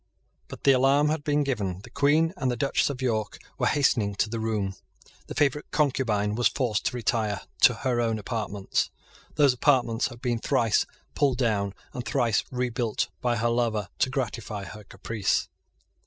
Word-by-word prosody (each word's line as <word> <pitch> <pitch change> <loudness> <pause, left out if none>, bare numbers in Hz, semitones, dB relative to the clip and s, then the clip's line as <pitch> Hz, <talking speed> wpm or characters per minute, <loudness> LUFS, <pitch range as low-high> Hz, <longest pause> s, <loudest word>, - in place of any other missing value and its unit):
But - - -10
the 140 - +6
alarm 135 +3 +4
had 155 -1 -1
been 145 0 +1
given. 100 -9 -2
The - - -13
Queen 155 +4 +3
and 135 -8 -1
the 125 - 0
Duchess 135 +5 +1
of 135 -2 -5
York 110 -4 -1 0.2
were - - +2
hastening 115 -8 +2
to 105 +2 0
the 115 - -2
room. 105 -3 -1 0.5
The - - -7
favourite 145 0 +1
concubine 125 -9 +1
was 120 +2 +3
forced 115 -6 -1
to - - 0
retire 110 -4 0 0.2
to 125 - +7
her 120 0 0
own 115 -1 0
apartments. 105 -2 -2 0.5
Those 140 -4 +5
apartments 125 -3 +2
had 120 -2 -11
been 120 -2 -1
thrice 115 -1 +2 0.3
pulled 140 -4 +2
down 105 -6 0 0.2
and 125 -3 -4
thrice 120 -1 +1
rebuilt 125 -3 -1
by 120 -1 +1
her 115 +1 +1
lover 115 -5 0
to - - +2
gratify 115 -5 -3
her 105 +2 -9
caprice. 100 +1 -1
120 Hz, 170 wpm, -26 LUFS, 105-135 Hz, 0.5 s, to